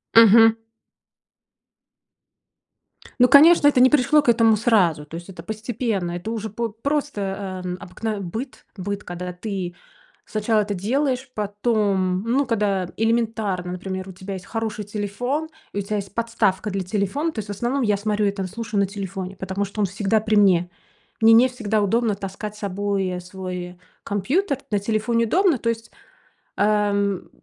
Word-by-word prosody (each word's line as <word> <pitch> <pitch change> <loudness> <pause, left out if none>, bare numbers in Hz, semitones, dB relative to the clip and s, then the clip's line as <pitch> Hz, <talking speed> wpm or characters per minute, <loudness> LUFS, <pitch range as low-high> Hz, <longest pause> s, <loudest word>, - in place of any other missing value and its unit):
Мгм. 225 0 +8 2.6
Ну, 250 - +7
конечно, 300 +1 +8
это 280 - +4
не 255 +1 +7
пришло 300 +1 +4
к 265 - 0
этому 225 -1 +5
сразу. 185 -10 +2
То 155 - -10
есть 170 +3 -8
это 180 -3 -10
постепенно, 220 -3 -3
это 175 +6 -5
уже 220 -1 -4
п 230 +3 -3
просто, 200 -10 -2
э, 180 0 -3
обыкновен 200 +1 -5
быт 240 +9 -6
быт, 200 +2 -4
когда 180 0 -6
ты 180 -2 -5 0.5
сначала 215 0 +1
это 205 0 -2
делаешь, 260 +7 -1
потом, 205 -3 0
ну, 260 +5 +1
когда 200 -5 0
элементарно, 220 -5 0
например, 190 +1 -5
у - - -9
тебя 190 +2 -7
есть 185 - -9
хороший 220 -2 -4
телефон 245 +10 -3 0.2
и 200 - -2
у - - 0
тя 210 +2 -3
есть 195 -1 -6
подставка 220 -4 0
для 195 0 -2
телефона, 210 - -1
то 225 - -6
есть 205 -1 -6
в - - -2
основном 240 +7 -1
я 210 -3 +2
смотрю 210 0 0
и - - +2
там 195 -2 -4
слушаю 215 +1 -3
на 200 - +2
телефоне, 195 -1 -6
потому 190 +2 -3
что 200 +2 -5
он - - +3
всегда 200 +3 0
при 215 0 0
мне. 185 -4 +4 0.5
Мне 225 0 +7
не 235 +3 +7
всегда 220 -4 -1
удобно 220 +1 +1
таскать 200 +2 -6
с 210 - -13
собой, 200 -1 -1
э, 180 -1 -3
свой, 185 0 -6
э, 180 0 -12 0.3
компьютер, 270 - 0
на 205 - +2
телефоне 220 +3 0
удобно. 345 - +3
То 230 - -1
есть, 225 0 -4 0.6
ам, 200 -2 +1
210 Hz, 170 wpm, -23 LUFS, 190-230 Hz, 2.6 s, Мгм